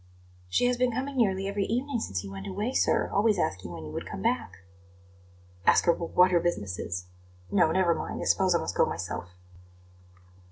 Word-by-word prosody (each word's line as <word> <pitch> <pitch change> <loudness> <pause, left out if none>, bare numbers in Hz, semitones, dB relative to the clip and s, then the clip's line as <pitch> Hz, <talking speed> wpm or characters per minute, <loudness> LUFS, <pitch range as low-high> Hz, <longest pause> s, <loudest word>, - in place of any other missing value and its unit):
"She 170 - +2
has 245 0 +2
been 250 0 +2
coming 270 +4 -3
nearly 195 -5 +1
every 200 0 -1
evening 250 +2 -1
since 95 - -3
you 100 - -8
went 95 0 -7
away, 210 +7 -2
sir, - - +2
always 210 0 +3
asking 95 - -2
when 80 -2 -7
you 75 - -7
would - - -5
come - - -6
back." 95 +1 -1 1.0
"Ask - - +4
her 170 - +5
w 170 - -5
what 180 +1 +6
her 175 - +4
business 105 - -2
is. 90 +1 -4 0.5
No; 160 - +4
never 180 -1 +3
mind; - - -5
I - - -3
suppose 185 -2 +3
I - - +5
must 85 - -3
go - - +4
myself." 85 0 -5
180 Hz, 200 wpm, -28 LUFS, -, 1.0 s, what